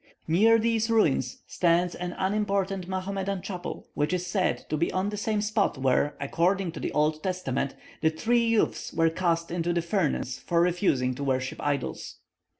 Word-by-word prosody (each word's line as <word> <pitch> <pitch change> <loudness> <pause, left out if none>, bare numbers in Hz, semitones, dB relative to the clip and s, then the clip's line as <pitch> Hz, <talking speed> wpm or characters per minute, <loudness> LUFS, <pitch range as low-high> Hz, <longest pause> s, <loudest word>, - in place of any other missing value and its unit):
Near 215 +8 +5
these 225 0 +1
ruins 155 - +1
stands 175 0 +2
an 180 0 -4
unimportant 195 -2 0
Mahomedan 190 0 -3
chapel, 180 -3 -6
which 150 +4 0
is 180 0 -1
said 185 0 0
to 155 - 0
be 165 +3 0
on 185 +2 0
the 210 - -4
same 210 0 -1
spot 210 -7 +1
where, 135 +2 +1
according 175 +6 +1
to - - -8
the - - -3
Old 155 +1 +1
Testament, 155 -8 -2 0.3
the 160 - +4
three 235 +9 +1
youths 230 -2 +1
were 165 0 +3
cast 170 -1 0
into 175 0 0
the 170 - +1
furnace 170 - -1
for 170 - 0
refusing 170 -8 +2
to 140 +3 -5
worship 130 -1 -1
idols. 140 -3 -2
180 Hz, 170 wpm, -27 LUFS, 155-200 Hz, 0.3 s, Near